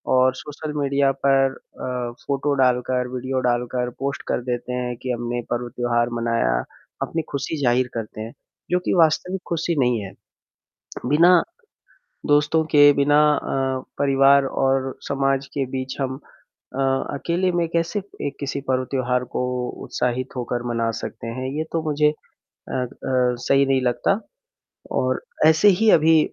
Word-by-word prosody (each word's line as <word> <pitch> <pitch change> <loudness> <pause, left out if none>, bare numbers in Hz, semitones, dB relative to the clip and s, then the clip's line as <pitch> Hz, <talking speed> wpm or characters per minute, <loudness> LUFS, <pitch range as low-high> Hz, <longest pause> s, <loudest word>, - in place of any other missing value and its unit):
और 130 0 +4
social 150 +2 -7
media 140 0 +2
पर 135 -1 +4
अ, 125 -1 -5 0.2
photo 140 +1 0
डालकर, 125 0 +1
वीडियो 130 +1 -2
डालकर 125 +1 -1
पोस्ट 140 +1 -2
कर - - 0
देते 120 +1 -3
हैं 125 -1 -2
कि 130 - -2
हमने 120 0 -2
पर्व, 120 0 -1
त्योहार 120 -1 0
मनाया, 115 - +1 0.5
अपनी 165 - -1
खुशी 140 +3 -3
जाहिर 125 +1 +3
करते 110 -1 -5
हैं, 115 +1 -6 0.4
जो 180 - +3
कि - - +1
वास्तविक 175 +3 +2
खुशी 170 0 -1
नहीं 125 -3 +2
है। 95 - -7 0.9
बिना 170 +7 +6 0.9
दोस्तों 150 +2 +3
के 145 0 +8
बिना 145 +1 +3 0.2
अ, 130 -1 -2 0.2
परिवार 140 0 +5
और 135 0 0
समाज 135 0 0
के 140 - 0
बीच 130 0 -4
हम 130 -1 -2
अ, 135 -1 -16 0.4
अकेले 175 +5 0
में 175 -1 +1
कैसे 170 +5 -1 0.2
एक 140 - -4
किसी 140 0 -3
पर्व, 130 0 +1
त्योहार 125 -1 0
को - - 0 0.4
उत्साहित 125 +2 -2
होकर 120 -1 -2
मना 115 -1 0
सकते - - -6
हैं, 130 +3 -4
ये 155 - 0
तो 165 -1 0
मुझे 150 0 +3 0.4
अ - - -11
अ, 125 -1 -1 0.6
सही 140 0 +4
नहीं 135 -1 +2
लगता 125 - +1 0.8
और 130 0 +1 0.3
ऐसे 160 +6 +6
ही 220 -1 +5
अभी 160 -1 +6
135 Hz, 150 wpm, -22 LUFS, 125-145 Hz, 0.9 s, के